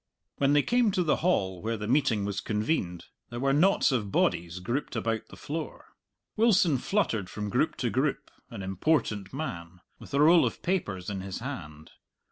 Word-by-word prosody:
When 140 Hz, 0 st, +3 dB
they 145 Hz, -1 st, +4 dB
came 245 Hz, -2 st, +3 dB
to 180 Hz, -, +2 dB
the 155 Hz, -, +2 dB
hall 95 Hz, -, 0 dB
where 115 Hz, +1 st, -2 dB
the 105 Hz, 0 st, -5 dB
meeting 120 Hz, -5 st, +2 dB
was 100 Hz, 0 st, -3 dB
convened, 105 Hz, -, -1 dB, 0.2 s
there 120 Hz, -, -6 dB
were 135 Hz, +1 st, +2 dB
knots 175 Hz, +2 st, +4 dB
of 105 Hz, -6 st, -1 dB
bodies 85 Hz, -1 st, 0 dB
grouped 120 Hz, +10 st, -3 dB
about 115 Hz, -1 st, -2 dB
the -, -, -13 dB
floor. 155 Hz, +1 st, -6 dB, 0.5 s
Wilson 190 Hz, -, +4 dB
fluttered 115 Hz, -, 0 dB
from 105 Hz, 0 st, -5 dB
group -, -, +1 dB
to -, -, -2 dB
group, -, -, -1 dB, 0.2 s
an 100 Hz, -, -7 dB
important 105 Hz, -, 0 dB
man, 90 Hz, -, -6 dB, 0.2 s
with -, -, -7 dB
a -, -, +2 dB
roll 165 Hz, +3 st, +6 dB
of -, -, -2 dB
papers 105 Hz, -, -2 dB
in 95 Hz, -2 st, -4 dB
his 95 Hz, -1 st, -5 dB
hand. 80 Hz, -, -7 dB
115 Hz, 180 wpm, -28 LUFS, 95-150 Hz, 0.5 s, roll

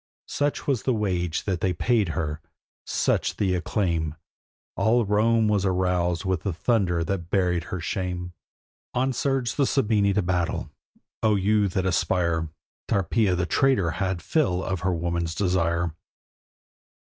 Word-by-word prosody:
Such 145 Hz, 0 st, -1 dB
was 135 Hz, -6 st, +1 dB
the 130 Hz, -, +1 dB
wage 90 Hz, -6 st, -1 dB
that 95 Hz, -3 st, -2 dB
they 95 Hz, -3 st, +1 dB
paid 105 Hz, +2 st, +1 dB
her, 75 Hz, 0 st, -2 dB, 0.5 s
such -, -, 0 dB
the 95 Hz, -3 st, +1 dB
acclaim: 85 Hz, -4 st, -1 dB, 0.6 s
All 115 Hz, +1 st, +3 dB
Rome 110 Hz, +2 st, +3 dB
was 105 Hz, -2 st, +2 dB
aroused 90 Hz, -2 st, 0 dB
with 95 Hz, -3 st, 0 dB
the 100 Hz, -, -1 dB
thunder 90 Hz, -3 st, +1 dB
that 85 Hz, 0 st, -3 dB
buried 90 Hz, -4 st, +1 dB
her 95 Hz, -, -4 dB
shame. 90 Hz, +1 st, -3 dB, 0.6 s
On 130 Hz, +1 st, +1 dB
surged 135 Hz, -1 st, -1 dB
the 140 Hz, -3 st, +3 dB
Sabini 105 Hz, -6 st, +2 dB
to 105 Hz, -, +2 dB
battle. 90 Hz, -1 st, -1 dB, 0.5 s
O 110 Hz, -1 st, +3 dB
you 100 Hz, +1 st, +2 dB
that 95 Hz, 0 st, -1 dB
aspire! 85 Hz, -3 st, +1 dB, 0.4 s
Tarpeia 100 Hz, +1 st, +1 dB
the 90 Hz, 0 st, 0 dB
traitor 125 Hz, -6 st, +2 dB
had 95 Hz, +1 st, -2 dB
fill 95 Hz, -, +1 dB
of 95 Hz, -2 st, -2 dB
her 95 Hz, +1 st, 0 dB
woman's 85 Hz, -1 st, -2 dB
desire. 85 Hz, -2 st, +1 dB
95 Hz, 145 wpm, -25 LUFS, 85-105 Hz, 0.6 s, All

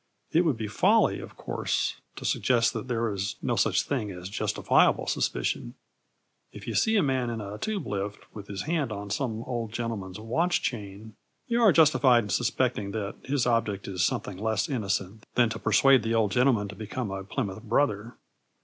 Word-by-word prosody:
It 170 Hz, +2 st, +3 dB
would 150 Hz, -8 st, +1 dB
be 110 Hz, -1 st, -3 dB
folly, 105 Hz, -, +3 dB
of -, -, -10 dB
course, -, -, -2 dB, 0.2 s
to -, -, -8 dB
suggest 120 Hz, -2 st, +2 dB
that -, -, -5 dB
there 115 Hz, -3 st, -1 dB
is 100 Hz, +1 st, -3 dB
no -, -, -1 dB
such -, -, +2 dB
thing 105 Hz, -, -2 dB
as 90 Hz, -1 st, -7 dB
justifiable 100 Hz, -, +2 dB
suspicion. -, -, -1 dB, 0.8 s
If -, -, -11 dB
you -, -, -4 dB
see 220 Hz, 0 st, +3 dB
a 195 Hz, -, +4 dB
man 130 Hz, -3 st, 0 dB
in 115 Hz, -1 st, -3 dB
a 105 Hz, 0 st, -7 dB
Tube 215 Hz, -3 st, -2 dB
lift 100 Hz, 0 st, -3 dB, 0.2 s
with 105 Hz, -2 st, -9 dB
his 100 Hz, -1 st, -5 dB
hand 155 Hz, -6 st, -1 dB
on 100 Hz, -1 st, -6 dB
some 115 Hz, -1 st, -2 dB
old 120 Hz, -3 st, -4 dB
gentleman's 110 Hz, -5 st, -4 dB
watch 160 Hz, +11 st, 0 dB
chain, 105 Hz, -1 st, -5 dB, 0.3 s
you 235 Hz, 0 st, +1 dB
are 220 Hz, -4 st, +7 dB
justified 140 Hz, -7 st, +5 dB
in 105 Hz, -, -7 dB
suspecting 120 Hz, -1 st, 0 dB
that 105 Hz, -3 st, -3 dB
his 140 Hz, -2 st, 0 dB
object 115 Hz, -5 st, 0 dB
is 90 Hz, -3 st, -1 dB
something 95 Hz, +1 st, -1 dB
less 110 Hz, +1 st, 0 dB
innocent 105 Hz, -4 st, -2 dB
than 120 Hz, -2 st, +4 dB
to -, -, -5 dB
persuade 115 Hz, +5 st, +5 dB
the 115 Hz, +1 st, -1 dB
old 110 Hz, -3 st, +2 dB
gentleman 125 Hz, -3 st, +3 dB
to 105 Hz, -, -8 dB
become 110 Hz, 0 st, -4 dB
a 95 Hz, 0 st, -4 dB
Plymouth 100 Hz, -1 st, -4 dB
Brother. 115 Hz, -1 st, 0 dB
110 Hz, 185 wpm, -27 LUFS, 100-130 Hz, 0.8 s, are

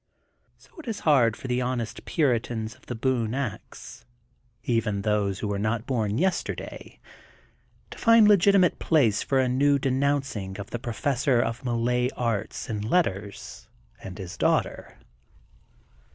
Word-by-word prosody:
So -, -, -23 dB
it 305 Hz, -, -11 dB
is 220 Hz, -3 st, -4 dB
hard 125 Hz, -8 st, +3 dB
for -, -, -8 dB
the 125 Hz, 0 st, 0 dB
honest 125 Hz, -2 st, -3 dB
puritans 115 Hz, -6 st, 0 dB
of -, -, -24 dB
The 120 Hz, -, -4 dB
Boone 120 Hz, -1 st, -1 dB
Ax, 130 Hz, -7 st, -6 dB, 0.6 s
even 110 Hz, -4 st, 0 dB
those 105 Hz, -2 st, 0 dB
who 105 Hz, -, -4 dB
were 100 Hz, -1 st, -2 dB
not 110 Hz, +2 st, -1 dB
bom 110 Hz, -5 st, -1 dB
yes 180 Hz, +3 st, +1 dB
terday, -, -, -8 dB, 0.9 s
to -, -, -9 dB
find 230 Hz, -2 st, +6 dB
legitimate 200 Hz, -2 st, +4 dB
place 125 Hz, -11 st, +2 dB
for 135 Hz, -, 0 dB
a 130 Hz, -1 st, +3 dB
new 140 Hz, +3 st, +3 dB
de 135 Hz, -1 st, -1 dB
nouncing 130 Hz, -8 st, -1 dB
of 100 Hz, -, -8 dB
the 120 Hz, -, -3 dB
Professor 130 Hz, +1 st, 0 dB
of 120 Hz, +1 st, -2 dB
Malay 125 Hz, 0 st, 0 dB
Arts 115 Hz, -4 st, -2 dB
and 105 Hz, -2 st, -3 dB
Letters 100 Hz, -, -2 dB, 0.3 s
and 95 Hz, -1 st, -8 dB
his 95 Hz, -1 st, -8 dB
daughter. -, -, -1 dB
120 Hz, 150 wpm, -26 LUFS, 110-140 Hz, 0.9 s, find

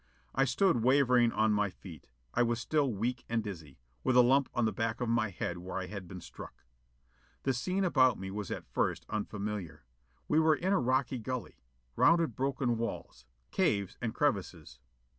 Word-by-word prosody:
I 135 Hz, -, +3 dB
stood 135 Hz, -, +2 dB
wavering 125 Hz, -2 st, +4 dB
on 110 Hz, 0 st, +2 dB
my 105 Hz, -1 st, +1 dB
feet. 90 Hz, -5 st, -12 dB, 0.3 s
I 120 Hz, -, +2 dB
was 120 Hz, -1 st, +1 dB
still 140 Hz, +2 st, +1 dB
weak 120 Hz, +4 st, -2 dB
and 115 Hz, -1 st, 0 dB
dizzy, 80 Hz, -9 st, -8 dB, 0.3 s
with 130 Hz, -, +2 dB
a 125 Hz, -, +8 dB
lump 135 Hz, +2 st, +3 dB
on 120 Hz, -, +2 dB
the 110 Hz, -, +1 dB
back 110 Hz, +2 st, -2 dB
of 120 Hz, -, -1 dB
my 115 Hz, -1 st, +1 dB
head 90 Hz, -1 st, -4 dB
where 90 Hz, +2 st, -6 dB
I 95 Hz, -, -3 dB
had 100 Hz, -1 st, -7 dB
been 90 Hz, 0 st, -8 dB
struck. 85 Hz, -, -11 dB, 0.8 s
The 135 Hz, -, +1 dB
scene 185 Hz, +11 st, -1 dB
about 130 Hz, -, +4 dB
me 95 Hz, 0 st, -6 dB
was 105 Hz, -1 st, -5 dB
at -, -, -5 dB
first -, -, -1 dB
unfamiliar. 105 Hz, -4 st, -4 dB, 0.4 s
We 155 Hz, -, +3 dB
were 160 Hz, -1 st, +4 dB
in 190 Hz, +5 st, 0 dB
a 195 Hz, -, +3 dB
rocky 130 Hz, 0 st, 0 dB
gully. 125 Hz, -3 st, -5 dB, 0.4 s
Rounded 165 Hz, -8 st, +4 dB
broken 130 Hz, -3 st, 0 dB
walls. 85 Hz, -, -5 dB, 0.2 s
Caves 100 Hz, -2 st, +1 dB
and 115 Hz, -3 st, -3 dB
crevices. 100 Hz, -, -2 dB
115 Hz, 180 wpm, -31 LUFS, 100-130 Hz, 0.8 s, a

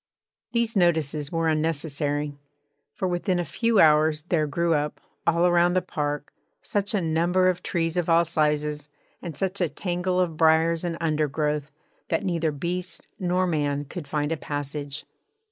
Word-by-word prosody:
These 235 Hz, -1 st, +1 dB
notices 155 Hz, -5 st, +1 dB
were 165 Hz, -1 st, 0 dB
unnecessary, 150 Hz, -2 st, -1 dB, 0.6 s
for 190 Hz, -, -1 dB
within 180 Hz, +1 st, 0 dB
a 175 Hz, -, -1 dB
few 230 Hz, +1 st, +1 dB
hours 155 Hz, 0 st, +5 dB
there 155 Hz, -3 st, +2 dB
grew 170 Hz, +3 st, +1 dB
up, 150 Hz, 0 st, -1 dB, 0.3 s
all 170 Hz, +1 st, +4 dB
around 175 Hz, 0 st, +4 dB
the 185 Hz, -, +2 dB
park, 145 Hz, -4 st, -3 dB, 0.3 s
such 205 Hz, +1 st, -1 dB
a 200 Hz, -, +1 dB
number 175 Hz, +3 st, +2 dB
of 180 Hz, -1 st, -1 dB
trees 165 Hz, -1 st, -1 dB
of 175 Hz, -1 st, 0 dB
all 170 Hz, +1 st, +5 dB
sizes, 150 Hz, -2 st, 0 dB, 0.3 s
and 170 Hz, -4 st, -6 dB
such 190 Hz, 0 st, -2 dB
a 175 Hz, -, +2 dB
tangle 180 Hz, +1 st, -1 dB
of 170 Hz, -4 st, 0 dB
briars 160 Hz, +1 st, +3 dB
and 170 Hz, -1 st, -2 dB
undergrowth, 150 Hz, -2 st, 0 dB, 0.4 s
that 165 Hz, -, 0 dB
neither 165 Hz, -4 st, 0 dB
beast 175 Hz, +5 st, -4 dB
nor 180 Hz, 0 st, +1 dB
man 145 Hz, -4 st, 0 dB
could 150 Hz, +2 st, -7 dB
find 150 Hz, 0 st, -1 dB
a 165 Hz, -, 0 dB
passage. 145 Hz, 0 st, -5 dB
165 Hz, 160 wpm, -25 LUFS, 150-175 Hz, 0.6 s, hours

